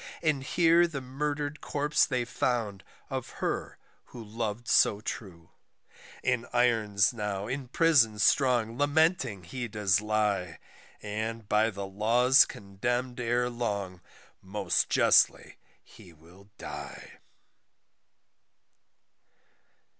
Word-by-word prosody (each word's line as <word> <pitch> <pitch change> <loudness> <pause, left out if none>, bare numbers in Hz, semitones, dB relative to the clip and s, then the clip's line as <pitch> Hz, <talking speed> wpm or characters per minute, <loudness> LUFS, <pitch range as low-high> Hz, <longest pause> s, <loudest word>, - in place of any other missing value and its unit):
And 150 -4 +1
here 170 +4 +3
the 150 -5 -5
murder'd 145 +3 -4
corpse 145 +1 +1
they 125 -2 -1
found, 115 -5 -2 0.3
of - - -4
her - - -3 0.3
who 120 - -11
lov'd 110 +1 -5
so 105 - +4
true, 90 -6 -8 0.7
In 125 -2 0
irons 110 -4 +2
now 105 -3 -4
in 130 +3 -5
Prison 135 -7 +3
strong 120 0 +2
lamenting 145 - +1
he 120 +8 -5
does 100 -3 +1
lie; 105 -5 -1 0.5
And, 110 +1 -4
by 110 +2 +2
the 100 -2 -6
laws 120 +7 +4
condemn'd 120 +6 -4
ere 120 0 0
long, 100 -7 -4 0.4
most 95 -1 -1
justly - - +3 0.2
he 85 - -16
will 85 +6 -19
die. - - -9
115 Hz, 105 wpm, -28 LUFS, 100-130 Hz, 0.7 s, so